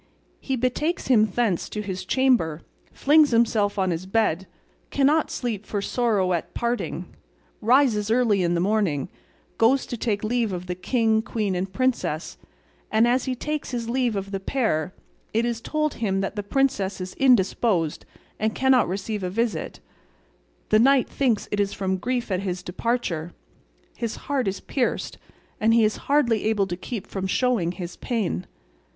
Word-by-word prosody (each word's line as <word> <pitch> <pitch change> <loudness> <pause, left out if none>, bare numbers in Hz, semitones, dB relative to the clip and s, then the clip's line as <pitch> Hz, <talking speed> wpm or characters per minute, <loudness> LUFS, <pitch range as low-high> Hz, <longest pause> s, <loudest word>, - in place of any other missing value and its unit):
He 265 - -2
betakes 255 +7 -1
him 220 -4 +5
thence 210 -3 0
to 210 - -5
his 190 -2 -4
chamber, 185 - +2 0.3
flings 300 +1 +4
himself 225 -3 +2
on 190 -2 +1
his 170 +2 -4
bed, 190 -4 +1 0.4
cannot 285 +3 +2
sleep 225 -5 -3
for 210 - -3
sorrow 200 -4 +1
at 170 - -3
parting, 235 +1 -3 0.5
rises 230 -3 +3
early 225 -4 +3
in 175 -1 +1
the - - +1
morning, 185 -7 0 0.5
goes 255 +4 +4
to - - -5
take 215 -3 -1
leave 225 -2 0
of 180 0 -5
the 180 - -3
king, 220 +4 +1
queen, 215 -3 -2
and 185 +1 -2
princess, 230 -9 -1 0.5
and, 220 +2 +4
as 250 +1 +2
he 260 - -1
takes 300 +4 -3
his 235 -2 -3
leave 245 -3 +1
of 195 0 -4
the 195 - -2
pair, 190 - -1 0.4
it 230 +1 +3
is 235 -1 -2
told 305 +2 -1
him 195 -4 -1
that 195 - -3
the 205 - -2
princess 205 -4 0
is 185 0 -5
indisposed 205 - +2 0.4
and 220 +1 0
cannot 265 -1 +4
receive 200 +3 -3
a 180 - -2
visit; 215 -4 -2 0.9
the 215 - +5
knight 265 +2 +4
thinks 245 -6 0
it 205 - -1
is 200 -1 +1
from 190 -1 -1
grief 245 +2 -2
at 185 - +1
his 185 -2 -3
departure, 180 -5 -2 0.6
his 230 -2 -3
heart 270 -6 0
is 195 0 -2
pierced, 255 -3 -2 0.4
and 225 +1 +4
he 230 - +5
is 215 0 +1
hardly 240 -8 +3
able 215 -2 +2
to 175 -2 -4
keep 210 +3 -6
from 190 -1 -4
showing 205 -5 +1
his 175 -1 -7
pain. 210 - -2
220 Hz, 170 wpm, -24 LUFS, 190-245 Hz, 0.9 s, him